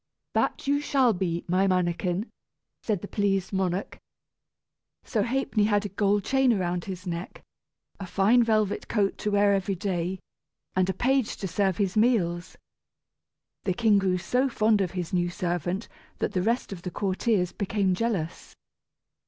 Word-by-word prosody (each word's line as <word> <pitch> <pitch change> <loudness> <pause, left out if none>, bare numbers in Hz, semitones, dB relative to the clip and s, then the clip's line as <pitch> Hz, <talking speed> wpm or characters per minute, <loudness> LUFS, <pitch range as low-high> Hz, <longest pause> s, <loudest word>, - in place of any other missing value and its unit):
"That - - +1
shall 280 -2 +2
you - - +3
be, 175 -2 -2
my 185 +3 +2
mannikin!" 180 +1 0 0.6
said 205 -5 -2
the - - -4
pleased 195 -2 0
monarch. 190 0 -2 1.0
So - - -1
Ha'penny 245 -4 +1
had 205 -1 +1
a - - -3
gold 200 +1 +1
chain 265 -2 +3
round 175 -1 -2
his 185 -1 -6
neck, 170 0 -5 0.6
a 195 - -6
fine 205 +7 +4
velvet 215 -3 +1
coat 205 -3 0
to 210 - -1
wear 205 0 +4
every 195 0 0
day, 180 0 -2 0.6
and 185 0 +2
a - - +1
page 265 -2 +1
to 195 - -4
serve 190 +1 0
his 195 -3 0
meals. 195 -7 +1 1.1
The 185 - 0
king 215 -2 +4
grew 185 -2 +1
so 250 +9 0
fond 215 -3 +2
of 185 - 0
his 180 -2 -4
new 175 -1 +1
servant 175 +3 -2 0.3
that - - -1
the 185 -3 0
rest 230 +1 0
of 175 - -9
the 180 - -4
courtiers 190 0 0
became 200 -1 0
jealous. 185 -5 -3
195 Hz, 160 wpm, -27 LUFS, 180-215 Hz, 1.1 s, fine